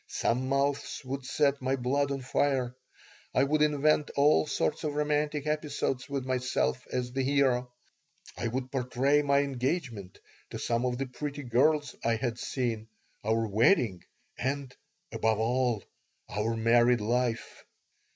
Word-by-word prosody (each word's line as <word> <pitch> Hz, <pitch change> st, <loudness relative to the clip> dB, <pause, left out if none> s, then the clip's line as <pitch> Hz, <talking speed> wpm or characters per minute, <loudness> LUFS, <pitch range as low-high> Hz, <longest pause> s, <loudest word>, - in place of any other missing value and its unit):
Some 130 Hz, +3 st, -1 dB
mouths 140 Hz, +2 st, 0 dB
would 130 Hz, 0 st, -5 dB
set 140 Hz, -2 st, +1 dB
my 130 Hz, +1 st, +1 dB
blood 135 Hz, +2 st, 0 dB
on 140 Hz, -1 st, -3 dB
fire. 130 Hz, -2 st, 0 dB, 0.6 s
I -, -, +5 dB
would 150 Hz, +2 st, +1 dB
invent 150 Hz, 0 st, +3 dB
all 150 Hz, +2 st, +4 dB
sorts 150 Hz, -, -1 dB
of 150 Hz, -2 st, -2 dB
romantic 150 Hz, 0 st, 0 dB
episodes 150 Hz, -4 st, -2 dB
with 140 Hz, -2 st, -3 dB
myself 130 Hz, 0 st, -1 dB
as 125 Hz, -1 st, -2 dB
the 135 Hz, -, 0 dB
hero. 130 Hz, -2 st, +2 dB, 0.6 s
I -, -, -2 dB
would 130 Hz, +2 st, -3 dB
portray 135 Hz, +2 st, +2 dB
my 140 Hz, -1 st, +3 dB
engagement 130 Hz, -, -3 dB, 0.3 s
to -, -, -6 dB
some 115 Hz, +1 st, 0 dB
of 125 Hz, -1 st, -2 dB
the 135 Hz, -, -2 dB
pretty 145 Hz, +3 st, -5 dB
girls 140 Hz, +5 st, +2 dB
I 115 Hz, 0 st, +2 dB
had 120 Hz, 0 st, -3 dB
seen, 115 Hz, -4 st, -2 dB, 0.4 s
our 110 Hz, +1 st, +1 dB
wedding, 110 Hz, -, +3 dB, 0.4 s
and, 135 Hz, 0 st, -2 dB, 0.4 s
above 110 Hz, -1 st, +1 dB
all, 120 Hz, -2 st, +1 dB, 0.5 s
our 110 Hz, +2 st, -1 dB
married 120 Hz, +2 st, +4 dB
life. 120 Hz, +1 st, -1 dB
130 Hz, 140 wpm, -29 LUFS, 120-140 Hz, 0.6 s, I